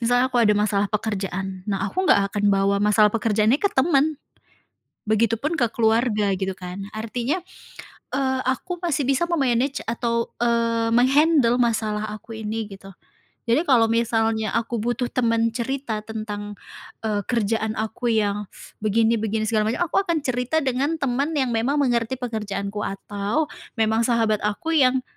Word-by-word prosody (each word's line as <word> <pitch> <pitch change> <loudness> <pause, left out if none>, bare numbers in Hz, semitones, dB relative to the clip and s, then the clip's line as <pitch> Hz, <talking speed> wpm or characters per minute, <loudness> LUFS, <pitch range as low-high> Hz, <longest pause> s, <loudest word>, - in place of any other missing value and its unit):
misalnya 245 +2 +2
kalau 245 -1 +3
ada 210 - +4
masalah 205 -1 +1
pekerjaan, 195 -3 -3
nah 195 -1 -1
aku 375 - -1
enggak 200 0 +4
akan 205 -1 -1
bawa 200 0 +2
masalah 210 0 +4
pekerjaannya 225 +3 +2
ke 405 - +3
temen. 295 +2 +2 0.9
Begitupun 230 +6 +1
ke 240 - +3
keluarga 220 -2 +1
gitu 190 0 -2
kan. 185 +2 -7
Artinya, 240 +9 -2 0.8
eee, 265 -1 0
aku 350 +7 -2
masih 330 -5 0
bisa 275 +6 +1
me-manage 270 -5 0
atau 235 0 -1
eee, 230 -1 +1
meng-handle 270 0 +4
masalah 215 -3 0
aku 220 +1 -8
ini, 220 +1 -3
gitu. 195 0 -11 0.5
Jadi 240 +5 +3
kalau 240 -4 +5
misalnya 225 -1 +1
aku 230 0 -2
butuh 240 +2 -1
temen 230 -2 +1
cerita 240 -1 -3
tentang, 210 -2 -5 0.5
eee, 210 -2 0
kerjaan 220 -2 0
aku 220 +3 -2
yang 205 -1 0 0.3
begini 225 +2 +2
begini 220 0 -1
segala 215 -1 +1
macam. 250 +10 0
Aku - - +1
akan 330 -4 0
cerita 255 +5 0
dengan 270 +4 0
temen 280 +2 -1
yang 260 -4 +1
memang 235 +5 +1
mengerti 240 -1 0
pekerjaanku 210 -4 -4
atau 205 +8 -2 0.3
memang 220 0 +2
sahabat 225 -3 +2
aku 210 +10 -2
yang 260 -4 +3
230 Hz, 150 wpm, -23 LUFS, 210-255 Hz, 0.9 s, kalau